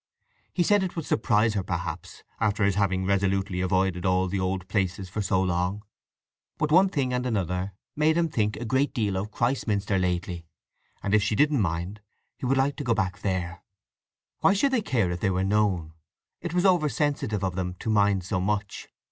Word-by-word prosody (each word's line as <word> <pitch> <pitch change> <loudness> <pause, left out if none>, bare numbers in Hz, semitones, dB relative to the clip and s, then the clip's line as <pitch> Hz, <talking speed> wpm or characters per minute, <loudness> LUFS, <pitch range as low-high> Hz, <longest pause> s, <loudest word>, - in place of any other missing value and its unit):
He 175 - +1
said 205 +3 +4
it 185 -2 -3
would 165 -3 -4
surprise 110 -1 +2
her, 100 - 0
perhaps, 90 -2 -5 0.2
after 105 0 +1
his 100 0 +3
having 95 -1 0
resolutely 95 -1 0
avoided 95 -1 +1
all 95 0 +2
the 95 +1 -2
old 95 0 -2
places 95 -2 -1
for 105 +3 -3
so 95 -2 +1
long. 90 +2 -1 0.7
But 155 -1 -1
one 185 +4 +6
thing 135 -8 -1
and 125 0 0
another 100 -8 -1
had 95 +2 -4 0.2
made 155 +2 +3
him 170 -1 +2
think 105 -8 0
a 120 - -5
great 130 +5 +1
deal 105 -6 0
of 95 +3 -2
Christminster 105 -5 0
lately, 90 -1 -2 0.6
and, 100 - -1
if 110 - +5
she 105 +1 0
didn't 150 0 +3
mind, 90 +3 -2 0.3
he 125 - -4
would 135 +1 +2
like 135 +2 +1
to 145 - -4
go 120 -3 +1
back 95 -3 -1
there. 90 -3 -2 0.8
Why 195 - +4
should 270 +8 +2
they 255 -4 +2
care 115 - 0
if 85 - -3
they 95 - +1
were 95 0 0
known? 95 -5 +1 0.5
It 175 0 -4
was 180 +2 +2
oversensitive 145 - +1
of 95 -1 0
them 90 -1 -3
to 110 - -3
mind 100 -3 +3
so 95 +1 -1
much. 100 +1 -2
100 Hz, 200 wpm, -26 LUFS, 95-125 Hz, 0.8 s, one